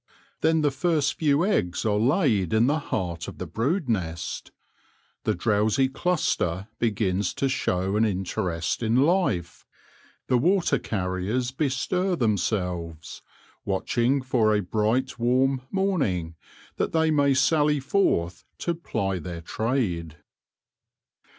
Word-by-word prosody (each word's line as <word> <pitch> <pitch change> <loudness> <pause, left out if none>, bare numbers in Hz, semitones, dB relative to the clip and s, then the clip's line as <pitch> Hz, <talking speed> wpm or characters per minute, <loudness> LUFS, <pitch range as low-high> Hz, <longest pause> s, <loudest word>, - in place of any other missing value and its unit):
Then 160 0 +2
the 145 -1 +2
first 150 -1 +1
few 150 +1 +3
eggs 90 - 0
are 105 -1 +2
laid 120 - +2
in 110 +2 +4
the 150 +4 +2
heart 85 - -3
of - - -8
the 90 - -5
brood 130 - -1
nest; 85 -7 -3 0.8
the - - +1
drowsy 110 +6 +2
cluster 130 - -1
begins 100 -4 0
to 135 - 0
show 95 -7 -1
an 110 - +3
interest 90 -4 -1
in 115 0 +1
life; 130 - +1 0.6
the 125 - +2
water 170 -2 +2
carriers 100 +5 -2
bestir 155 +7 0
themselves, 90 - -2 0.4
watching 120 +7 0
for 115 -5 +2
a 105 - 0
bright 110 +7 0
warm 130 +2 +2
morning, 140 - 0 0.4
that - - -1
they 160 -1 +3
may 140 -2 +3
sally 150 +1 +3
forth 95 - 0
to 170 - -1
ply 100 - -2
their 85 0 -6
trade. 90 - -2
115 Hz, 125 wpm, -25 LUFS, 95-145 Hz, 0.8 s, in